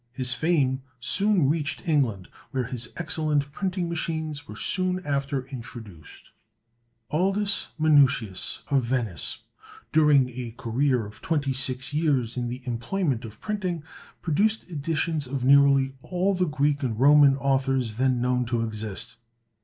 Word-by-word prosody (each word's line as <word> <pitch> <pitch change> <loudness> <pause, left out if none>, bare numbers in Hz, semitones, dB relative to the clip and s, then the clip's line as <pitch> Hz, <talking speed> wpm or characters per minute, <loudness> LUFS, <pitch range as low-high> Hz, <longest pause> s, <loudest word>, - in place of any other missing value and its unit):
His 130 0 +4
fame 140 -4 +1 0.2
soon 195 - +2
reached 155 +4 -2
England, 125 - +1 0.2
where 130 -3 -1
his 120 -1 -4
excellent 155 -4 0
printing 185 +1 -2
machines 160 -3 -4
were 105 - -9
soon 185 - +1
after 140 -2 -1
introduced. 115 - -10 0.8
Aldus 195 +5 +1
Manutius, 140 -11 +2
of 135 -2 +3
Venice, 115 - -2 0.5
during 150 -4 +4
a 120 -2 -7
career 125 0 0
of 105 - -12
twenty 145 -4 0
six 130 0 0
years 140 -7 +1
in 120 -1 -2
the 125 +2 -6
employment 125 +2 -2
of 110 - -11
printing, 185 -7 -3 0.4
produced 200 +5 0
editions 155 -1 -2
of 130 -1 -3
nearly 140 -1 +5
all 185 +5 0
the 180 -1 0
Greek 145 -1 0
and 115 -5 -2
Roman 140 0 +6
authors 135 -4 0
then 130 -1 +2
known 125 0 +1
to 120 -1 -1
exist. 110 0 -6
140 Hz, 135 wpm, -25 LUFS, 125-160 Hz, 0.8 s, Roman